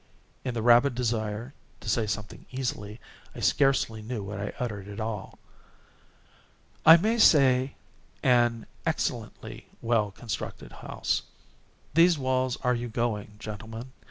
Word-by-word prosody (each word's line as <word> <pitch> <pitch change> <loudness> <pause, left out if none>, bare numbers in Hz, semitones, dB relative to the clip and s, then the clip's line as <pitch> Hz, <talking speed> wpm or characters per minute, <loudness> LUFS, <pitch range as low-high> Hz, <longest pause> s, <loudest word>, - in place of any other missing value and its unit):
(In 125 -2 -3
the 115 - -2
rabid 120 +2 +5
desire 115 0 -2 0.3
to 110 - -11
say 110 0 +1
something 105 0 -5
easily, 120 -5 -4 0.4
I - - -7
scarcely 135 -5 +2
knew 110 -1 -4
what 100 0 -6
I 100 +1 -3
uttered 105 -5 -4
at 105 +1 -8 1.9
all.)—"I 165 - +12
may 220 +7 +1
say 135 - +5 0.5
an 120 -2 +3 0.2
excellently - - -3
well 115 -3 +1
constructed 105 -1 -6
house. - - -2 0.7
These 170 +2 +5
walls—are 130 -1 0
you 120 0 -2
going, 110 -3 -2
gentlemen? 110 +3 -7
120 Hz, 120 wpm, -28 LUFS, 105-130 Hz, 1.9 s, all.)—"I